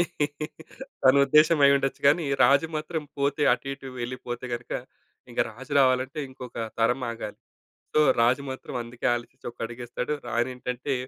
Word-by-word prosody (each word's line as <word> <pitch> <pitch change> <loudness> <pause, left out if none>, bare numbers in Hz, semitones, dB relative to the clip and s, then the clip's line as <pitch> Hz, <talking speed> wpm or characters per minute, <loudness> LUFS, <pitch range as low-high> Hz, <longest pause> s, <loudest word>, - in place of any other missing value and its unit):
అని 175 - +4 1.0
తన 130 +1 +7
ఉద్దేశ్యం 155 +2 +5
అయ్యుండొచ్చు. 140 -1 +2
కానీ 155 +3 +3 0.2
రాజు 140 +5 +5
మాత్రం 155 +1 -3 0.2
పోతే, 140 +1 +1
అటు 125 - -2
ఇటు 135 -1 -8
వెళ్లిపోతే 120 0 -5
గనుక, 120 0 -8 0.6
ఇంక - - -1
రాజు 135 +6 -11
రావాలంటే 130 +3 +2
ఇంకొక 130 -1 -10 0.2
తరం 125 +3 +2
ఆగాలి. 115 -2 -7 0.6
సో, 155 - +5 0.2
రాజు 125 +4 +3
మాత్రం 130 0 -7
అందుకే 120 +1 -5
ఆలోచించి 120 +1 -7
ఒక - - -39
అడుగేస్తాడు. 120 +4 -5 0.2
రాణి 120 +2 0
ఏంటంటే, 125 +2 -3
130 Hz, 145 wpm, -26 LUFS, 120-140 Hz, 1.0 s, తన